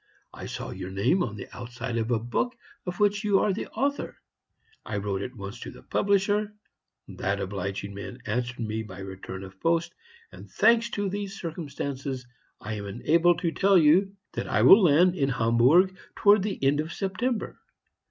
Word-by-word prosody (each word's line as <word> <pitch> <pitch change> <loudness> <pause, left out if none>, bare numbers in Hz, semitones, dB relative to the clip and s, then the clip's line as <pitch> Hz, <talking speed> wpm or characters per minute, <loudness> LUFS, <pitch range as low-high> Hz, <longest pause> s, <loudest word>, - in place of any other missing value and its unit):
I - - -8
saw - - -6
your 90 - -6
name 115 - +1
on 110 -10 -2
the 100 - -8
outside 120 0 -5
of 110 +1 -2
a 120 - +2
book 120 - -2 0.3
of 180 0 -4
which 205 +1 +2
you 205 -2 +3
are 200 - +2
the 205 - -4
author. 280 +5 -2 0.7
I 105 - -4
wrote 100 -1 -2
at 125 +5 -6
once 100 +2 -7
to - - -7
the - - -13
publisher; 205 +1 +1 0.5
that 100 +1 -2
obliging 100 +1 -4
man 100 +5 -8
answered 120 +2 -2
me 110 0 -2
by 100 -4 -9
return 95 0 -7
of 95 0 -12
post, 165 0 +1 0.4
and, - - -12
thanks 235 0 +3
to 205 0 0
these 200 +1 -4
circumstances, 140 -5 -5 0.3
I 110 - -5
am 100 - -6
enabled 165 - +2
to 170 - 0
tell 195 +3 +4
you 180 +5 +4 0.2
that - - -4
I - - +2
will 200 - +9
land 175 +2 +5
at 135 -1 +2
Hamburg 130 +11 +4 0.2
towards 205 0 +5
the 200 +1 -2
end 140 +2 +3
of 155 +2 -2
September. 210 +7 -2
145 Hz, 180 wpm, -27 LUFS, -, 0.7 s, will